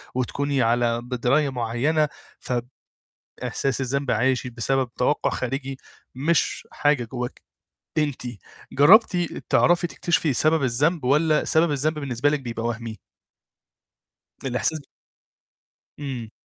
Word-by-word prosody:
وتكوني 140 Hz, +2 st, 0 dB
على 120 Hz, 0 st, +2 dB
بدراية 125 Hz, +4 st, +1 dB
مُعينة، 130 Hz, +6 st, 0 dB, 0.3 s
ف 125 Hz, -, -4 dB, 0.9 s
إحساس 135 Hz, -1 st, -1 dB
الذنب 140 Hz, +1 st, -1 dB
عاشِت 125 Hz, +2 st, +1 dB
بسبب 130 Hz, +2 st, 0 dB
توقع 135 Hz, +4 st, +1 dB
خارجي 135 Hz, +1 st, -3 dB, 0.4 s
مش 150 Hz, +6 st, 0 dB
حاجة 145 Hz, -4 st, +2 dB
جواكِ 125 Hz, -1 st, -5 dB, 0.6 s
أنتِ. 145 Hz, -3 st, -1 dB, 0.5 s
جربتِ 185 Hz, -, +6 dB, 0.3 s
تعرفي 175 Hz, 0 st, +4 dB
تكتشفي 170 Hz, -3 st, 0 dB
سبب 155 Hz, +4 st, +2 dB
الذنب 140 Hz, +5 st, +1 dB
والَّا 150 Hz, +3 st, +3 dB
سبب 160 Hz, 0 st, +2 dB
الذنب 150 Hz, +2 st, 0 dB
بالنسبة 140 Hz, 0 st, 0 dB
لِك 150 Hz, -2 st, 0 dB
بيبقى 115 Hz, -2 st, -4 dB
وهمي؟ 115 Hz, -1 st, -4 dB, 1.5 s
الإحساس 135 Hz, +4 st, -1 dB, 1.2 s
إمم. 125 Hz, -6 st, -5 dB
135 Hz, 105 wpm, -24 LUFS, 120-150 Hz, 1.5 s, جربتِ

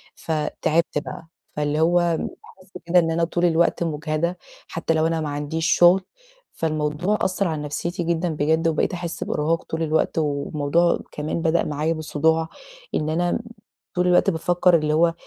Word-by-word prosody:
فتعبت 160 Hz, 0 st, -1 dB
بقى، 165 Hz, +2 st, -9 dB, 0.3 s
فاللي 150 Hz, +1 st, 0 dB
هو 175 Hz, +2 st, +4 dB, 0.4 s
حاسه 185 Hz, -1 st, -14 dB
كده 175 Hz, +1 st, +5 dB
إن 165 Hz, -1 st, +1 dB
أنا 165 Hz, +1 st, 0 dB
طول 175 Hz, +1 st, 0 dB
الوقت 170 Hz, 0 st, +2 dB
مُجهدة، 155 Hz, +2 st, -2 dB, 0.3 s
حتى 165 Hz, -, -1 dB
لو 160 Hz, 0 st, +2 dB
أنا 165 Hz, -1 st, -1 dB
ما 150 Hz, -, -3 dB
عنديش 150 Hz, +3 st, -2 dB
شغل. 175 Hz, +3 st, +6 dB, 0.5 s
فالموضوع 155 Hz, +5 st, -1 dB
أثر 190 Hz, 0 st, 0 dB
على 155 Hz, -2 st, -2 dB
نفسيتي 170 Hz, +4 st, -3 dB
جدًا 170 Hz, +1 st, 0 dB
بجد، 160 Hz, +2 st, +1 dB
وبقيت 160 Hz, +3 st, 0 dB
أحس 170 Hz, -1 st, -4 dB
بإرهاق 160 Hz, +3 st, -1 dB
طول 160 Hz, 0 st, -3 dB
الوقت، 160 Hz, +1 st, 0 dB
والموضوع 150 Hz, +3 st, +1 dB
كمان 155 Hz, +2 st, -3 dB
بدأ 165 Hz, 0 st, +2 dB
معايا 150 Hz, +2 st, -1 dB
بصداع، 160 Hz, +1 st, 0 dB, 0.5 s
إن 155 Hz, 0 st, 0 dB
أنا 175 Hz, +2 st, 0 dB, 0.6 s
طول 180 Hz, 0 st, +2 dB
الوقت 180 Hz, -, +4 dB
بافكر، 175 Hz, +2 st, +3 dB
اللي 155 Hz, -1 st, 0 dB
هو 165 Hz, +1 st, +3 dB
165 Hz, 155 wpm, -23 LUFS, 155-170 Hz, 0.6 s, شغل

